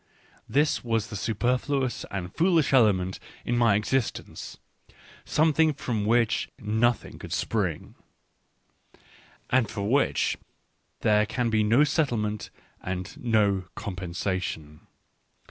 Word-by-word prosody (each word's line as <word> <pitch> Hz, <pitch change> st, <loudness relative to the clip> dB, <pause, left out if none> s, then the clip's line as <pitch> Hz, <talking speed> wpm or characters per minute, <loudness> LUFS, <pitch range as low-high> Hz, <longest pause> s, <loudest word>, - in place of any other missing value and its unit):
This 150 Hz, +2 st, +2 dB
was 115 Hz, -3 st, -1 dB
the -, -, -5 dB
superfluous 125 Hz, +5 st, -1 dB
and 95 Hz, -2 st, -5 dB
foolish 165 Hz, -5 st, +3 dB
element 95 Hz, -7 st, +3 dB, 0.3 s
in 120 Hz, -, 0 dB
my 115 Hz, -4 st, +4 dB
existence; 115 Hz, +4 st, -2 dB, 0.7 s
something 155 Hz, 0 st, +3 dB
from 115 Hz, -7 st, -2 dB
which 115 Hz, 0 st, +2 dB
nothing 110 Hz, +2 st, 0 dB
could -, -, -9 dB
spring, -, -, -2 dB, 1.6 s
and 130 Hz, -3 st, +3 dB
for 100 Hz, 0 st, -3 dB
which 140 Hz, +6 st, +2 dB, 0.6 s
there 105 Hz, 0 st, +3 dB
can 120 Hz, 0 st, -1 dB
be 110 Hz, -1 st, +3 dB
no 115 Hz, +7 st, +4 dB
settlement 115 Hz, -, 0 dB, 0.3 s
and 90 Hz, 0 st, -5 dB
no 105 Hz, -5 st, +2 dB
compensation. 90 Hz, -5 st, -4 dB
110 Hz, 105 wpm, -27 LUFS, 100-130 Hz, 1.6 s, my